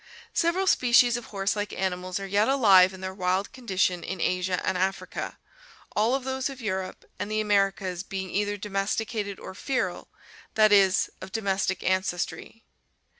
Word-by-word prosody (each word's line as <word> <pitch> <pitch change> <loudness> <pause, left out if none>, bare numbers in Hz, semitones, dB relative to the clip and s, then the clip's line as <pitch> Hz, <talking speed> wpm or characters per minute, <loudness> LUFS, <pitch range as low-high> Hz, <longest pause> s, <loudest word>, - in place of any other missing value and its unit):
— - - -24
Several 350 +3 +1
species 245 -6 +5
of 240 - -5
horse 195 +1 -1
like 205 0 -3
animals 185 0 -2
are 195 - -5
yet 205 +4 +2
alive 195 -9 +6
in 190 -1 -11
their 190 0 -4
wild 185 +1 -1
condition 190 -7 0
in 185 +1 -5
Asia 180 +1 0
and 190 - 0
Africa, 190 +2 -2 0.6
all 225 +5 +3
of 270 - -3
those 265 +1 -2
of 270 -1 -9
Europe 190 -5 -4
and 205 - -3
the 215 0 0
Americas 195 -3 +1
being 190 -2 -5
either 205 0 -1
domesticated 205 +1 -2
or - - -8
feral, 260 +6 -2 0.5
that 215 -1 +5
is, 195 -1 +4
of 185 - -8
domestic 195 -3 -1
ancestry. 185 +4 -2
195 Hz, 165 wpm, -26 LUFS, 185-220 Hz, 0.6 s, alive